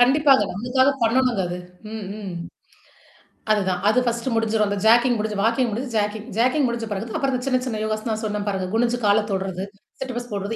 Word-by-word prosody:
கண்டிப்பாங்க, 270 Hz, 0 st, +5 dB
நம்மளுக்காக 250 Hz, +7 st, +2 dB
பண்ணணுங்க 240 Hz, -1 st, +2 dB
அது, 175 Hz, +1 st, -4 dB, 0.4 s
ம் 220 Hz, -2 st, -5 dB
ம். 195 Hz, -4 st, -6 dB, 1.2 s
அதுதான். 190 Hz, -4 st, +1 dB
அது 250 Hz, -, +4 dB
ஃபர்ஸ்ட்ட் 235 Hz, +1 st, -1 dB
முடிஞ்சிரும். 220 Hz, -1 st, +1 dB
அந்த 205 Hz, -, -1 dB
ஜாக்கிங் 240 Hz, +1 st, +5 dB
முடிஞ்சு, 210 Hz, -1 st, -2 dB
வாக்கிங் 230 Hz, +2 st, +2 dB
முடிசு 245 Hz, +4 st, -3 dB, 0.5 s
ஜாக்கிங் 255 Hz, +3 st, +3 dB
முடிஞ்ச 235 Hz, -1 st, -3 dB
பிறகு 215 Hz, +3 st, -4 dB
அப்புறம் 270 Hz, -1 st, 0 dB
அந்த 250 Hz, -, -3 dB
சின்ன 255 Hz, -2 st, +2 dB
சின்ன 220 Hz, -4 st, -3 dB
யோகாஸ் 215 Hz, +1 st, -2 dB
தான் 220 Hz, 0 st, -2 dB
சொன்னே 210 Hz, -1 st, -2 dB
பிறகு 190 Hz, -2 st, -2 dB
குனுஞ்சு 240 Hz, +1 st, +1 dB
கால 210 Hz, +1 st, +4 dB
தொடுறது, 190 Hz, 0 st, -2 dB, 0.4 s
சிட்அப்ஸ் 245 Hz, -2 st, -5 dB
போடுறது 200 Hz, +2 st, -3 dB
225 Hz, 175 wpm, -23 LUFS, 210-250 Hz, 1.2 s, கண்டிப்பாங்க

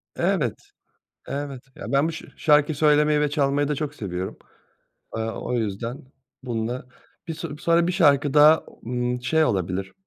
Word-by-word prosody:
Evet, -, -, +1 dB, 0.8 s
evet. 140 Hz, -2 st, -4 dB
Ya, -, -, -7 dB
ben 140 Hz, +3 st, +3 dB
bu 165 Hz, -, -3 dB
şa 165 Hz, -, -8 dB
şarkıyı 150 Hz, 0 st, +3 dB
söylemeyi 150 Hz, 0 st, +4 dB
ve 150 Hz, -1 st, +1 dB
çalmayı 145 Hz, -1 st, +1 dB
da 150 Hz, -, 0 dB
çok 145 Hz, 0 st, -4 dB
seviyorum. 95 Hz, -5 st, -5 dB, 0.8 s
Eee, -, -, -1 dB
o 115 Hz, +2 st, -4 dB
yüzden 115 Hz, +2 st, -3 dB, 0.4 s
bununla. 120 Hz, 0 st, -3 dB, 0.4 s
Bi 165 Hz, -, -3 dB
so 155 Hz, -2 st, -6 dB
sonra 170 Hz, +2 st, +2 dB
bir -, -, +1 dB
şarkı 145 Hz, -6 st, +3 dB
daha, 150 Hz, +2 st, +7 dB, 0.2 s
ımm, 125 Hz, 0 st, -2 dB
şey 160 Hz, +5 st, +3 dB
olabilir, 95 Hz, -, -1 dB
140 Hz, 155 wpm, -24 LUFS, 120-150 Hz, 0.8 s, daha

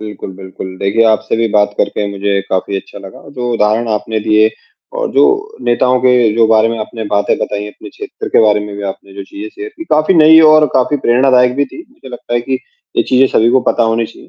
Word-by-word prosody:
बिल्कुल, 105 Hz, -2 st, -8 dB
बिल्कुल, 95 Hz, -1 st, -9 dB
देखिए, 100 Hz, +4 st, +1 dB
आपसे 110 Hz, 0 st, 0 dB
भी 115 Hz, 0 st, +1 dB
बात 105 Hz, 0 st, +1 dB
करके 105 Hz, -, -1 dB
मुझे 100 Hz, 0 st, -1 dB
काफ़ी 95 Hz, +1 st, -2 dB
अच्छा 95 Hz, -, -9 dB
लगा। 95 Hz, -1 st, -12 dB
जो 125 Hz, -1 st, -3 dB
उदाहरण 110 Hz, +1 st, 0 dB
आपने 110 Hz, 0 st, -2 dB
दिए 110 Hz, +1 st, +3 dB, 0.5 s
और -, -, -2 dB
जो -, -, +4 dB, 0.4 s
नेताओं 125 Hz, +1 st, +2 dB
के 125 Hz, -1 st, +3 dB, 0.2 s
जो 115 Hz, 0 st, +3 dB
बारे 110 Hz, 0 st, +3 dB
में 115 Hz, 0 st, -4 dB
आपने 110 Hz, +1 st, -6 dB
बातें 100 Hz, 0 st, +1 dB
बताई, 105 Hz, 0 st, -4 dB
अपने 105 Hz, 0 st, -13 dB
क्षेत्र -, -, -8 dB
के -, -, +3 dB
बारे 105 Hz, -1 st, +2 dB
में 105 Hz, 0 st, -7 dB
भी 100 Hz, -, -7 dB
आपने 100 Hz, -, -20 dB
जो 100 Hz, -, -7 dB
चीजें 315 Hz, +3 st, -9 dB
शेयर 395 Hz, +4 st, -9 dB
की, 330 Hz, -, -8 dB
काफ़ी 155 Hz, -, +1 dB
नई 160 Hz, 0 st, +7 dB
और 155 Hz, 0 st, +5 dB
काफ़ी 130 Hz, +3 st, +1 dB
प्रेरणादायक 125 Hz, 0 st, +3 dB
भी 145 Hz, -, +1 dB
थी, 330 Hz, -, -13 dB
मुझे 200 Hz, -, -15 dB
लगता 120 Hz, -1 st, -7 dB
है 120 Hz, -, +1 dB
कि 130 Hz, +2 st, -3 dB, 0.4 s
ये -, -, +3 dB
चीज़ें 130 Hz, +1 st, +4 dB
सभी 115 Hz, +2 st, +3 dB
को 130 Hz, +1 st, +3 dB
पता -, -, 0 dB
होनी 115 Hz, 0 st, -1 dB
चाहिए। 115 Hz, -, -16 dB
115 Hz, 225 wpm, -13 LUFS, 105-130 Hz, 0.5 s, नई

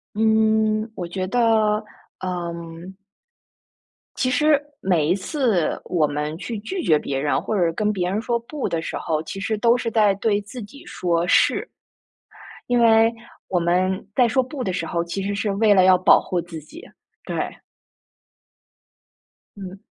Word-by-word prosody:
嗯， 220 Hz, 0 st, +2 dB
我 180 Hz, -, -5 dB
觉 185 Hz, +2 st, -4 dB
得， 220 Hz, +6 st, -2 dB, 0.8 s
呃 175 Hz, -2 st, -4 dB, 1.6 s
其 255 Hz, -, 0 dB
实 295 Hz, +3 st, +3 dB, 0.2 s
每 175 Hz, -6 st, +1 dB
一 175 Hz, -, +3 dB
次 200 Hz, -, 0 dB
我 165 Hz, -4 st, +1 dB
们 150 Hz, +1 st, -3 dB
去 225 Hz, +3 st, -5 dB
拒 365 Hz, -, -4 dB
绝 155 Hz, -, +3 dB
别 135 Hz, -2 st, -3 dB
人， 145 Hz, +1 st, 0 dB
或 215 Hz, -, -3 dB
者 170 Hz, -2 st, +2 dB
跟 210 Hz, +5 st, 0 dB
别 180 Hz, -3 st, -1 dB
人 205 Hz, +3 st, -1 dB
说 235 Hz, +1 st, -1 dB
不 270 Hz, +3 st, -4 dB
的 165 Hz, -3 st, -1 dB
时 -, -, -5 dB
候， 155 Hz, -2 st, -2 dB
其 195 Hz, +5 st, -7 dB
实 220 Hz, +2 st, -1 dB
都 235 Hz, +2 st, +4 dB
是 240 Hz, -2 st, -3 dB
在 210 Hz, -3 st, +3 dB
对 205 Hz, 0 st, +1 dB
自 230 Hz, +4 st, -9 dB
己 280 Hz, +10 st, -12 dB
说 175 Hz, -, -1 dB
是。 -, -, +3 dB, 1.0 s
因 245 Hz, 0 st, +2 dB
为 225 Hz, 0 st, +5 dB, 0.3 s
我 180 Hz, -, 0 dB
们 185 Hz, +3 st, 0 dB
在 250 Hz, -2 st, +4 dB
说 260 Hz, +3 st, +2 dB
不 260 Hz, +1 st, -5 dB
的 190 Hz, -, -2 dB
时 185 Hz, -, -2 dB
候， 170 Hz, -1 st, -1 dB
其 170 Hz, +3 st, -4 dB
实 200 Hz, +1 st, -2 dB
是 205 Hz, 0 st, -1 dB
为 210 Hz, +1 st, +4 dB
了 190 Hz, -2 st, +5 dB
要 185 Hz, 0 st, +6 dB
保 185 Hz, -, +5 dB
护 180 Hz, -2 st, -2 dB
自 170 Hz, -1 st, -9 dB
己， 310 Hz, -, -13 dB, 0.4 s
对。 -, -, -4 dB, 2.2 s
嗯。 195 Hz, -1 st, -9 dB
200 Hz, 180 characters per minute, -22 LUFS, 175-225 Hz, 2.2 s, 要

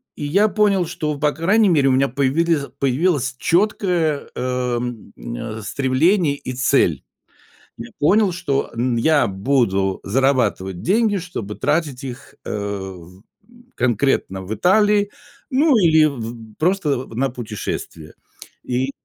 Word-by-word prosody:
И -, -, -7 dB
я 195 Hz, +9 st, +3 dB
понял, 200 Hz, -4 st, +2 dB
что, 150 Hz, -2 st, -3 dB
по 150 Hz, 0 st, +2 dB
крайней 200 Hz, +7 st, +3 dB
мере, 145 Hz, -5 st, +3 dB
у -, -, +3 dB
меня 135 Hz, +1 st, +3 dB
появились 140 Hz, +3 st, +1 dB
появилось 135 Hz, -1 st, +1 dB
четкое, 175 Hz, -5 st, +1 dB
эм, 125 Hz, -2 st, -3 dB
э, -, -, -6 dB
стремление 140 Hz, -, +1 dB
и 130 Hz, -, -6 dB
цель. 130 Hz, +1 st, +2 dB, 0.8 s
Я -, -, -8 dB
понял, 200 Hz, +5 st, +3 dB
что, 170 Hz, -6 st, -1 dB
м, 120 Hz, +1 st, 0 dB
я 150 Hz, +5 st, +3 dB
буду 95 Hz, -2 st, 0 dB
зарабатывать 110 Hz, -7 st, 0 dB
деньги, 205 Hz, +1 st, +2 dB
чтобы 165 Hz, -, -6 dB
тратить 150 Hz, -4 st, -1 dB
их, 130 Hz, 0 st, -9 dB
э, -, -, -6 dB
в 95 Hz, -3 st, -6 dB, 0.3 s
м, 240 Hz, +1 st, -22 dB
конкретно 120 Hz, -5 st, 0 dB
в 95 Hz, +3 st, -6 dB
Италии, 205 Hz, -, +3 dB, 0.4 s
ну, 280 Hz, +1 st, +3 dB
или 160 Hz, -6 st, +5 dB
в 115 Hz, -5 st, -6 dB
просто 155 Hz, -7 st, 0 dB
на 135 Hz, +3 st, 0 dB
путешествия. 105 Hz, -9 st, -6 dB, 0.5 s
И 130 Hz, +2 st, -1 dB
135 Hz, 130 wpm, -20 LUFS, 115-175 Hz, 0.8 s, или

